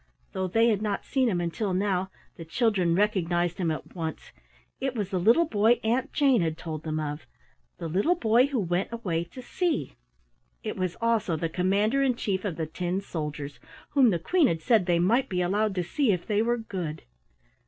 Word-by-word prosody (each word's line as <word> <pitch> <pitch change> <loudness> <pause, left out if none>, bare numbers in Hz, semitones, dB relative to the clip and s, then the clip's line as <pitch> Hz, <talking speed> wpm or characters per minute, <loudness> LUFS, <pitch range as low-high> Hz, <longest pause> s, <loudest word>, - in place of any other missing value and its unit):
Though 190 0 -2
they 225 +5 +3
had 210 -2 +1
not 205 -2 -2
seen 260 -3 +1
him 180 -5 0
until 180 +3 -2
now, 190 -1 0 0.3
the 165 - -8
children 185 -2 +1
recognized 175 -4 +1
him 175 -3 +1
at 155 - -5
once. 160 -3 -5 0.5
It 265 -1 -2
was 205 -4 -3
the 185 - 0
little 230 - +5
boy 225 -3 +3
Aunt 240 +4 0
Jane 270 - +3
had 160 -1 -1
told 155 -2 -5
them 155 -1 -3
of 150 0 -5 0.5
the 165 - -5
Little 200 - +2
Boy 240 -3 +3
who 275 -4 -1
Went 180 +1 -1
Away 180 -8 -2
to 255 +9 -11
Sea. 340 - -1 0.7
It - - -3
was 185 -2 -2
also 225 -6 +1
the 165 +1 -2
Commander 200 +9 +1
in 260 -3 +2
Chief 195 -4 -2
of 185 -5 -2
the 160 - -2
tin 175 +4 -2
soldiers, 150 -6 -5 0.3
whom 270 -4 +5
the 180 - +1
Queen 315 - +2
had 165 -1 -2
said 220 -7 +3
they 175 -1 +3
might 230 +10 +2
be 180 -2 0
allowed 205 +3 0
to 180 - 0
see, 230 - +1
if 180 -3 -1
they 210 -1 +1
were 240 +1 +1
good. 180 -9 -5
195 Hz, 200 wpm, -27 LUFS, 170-230 Hz, 0.7 s, little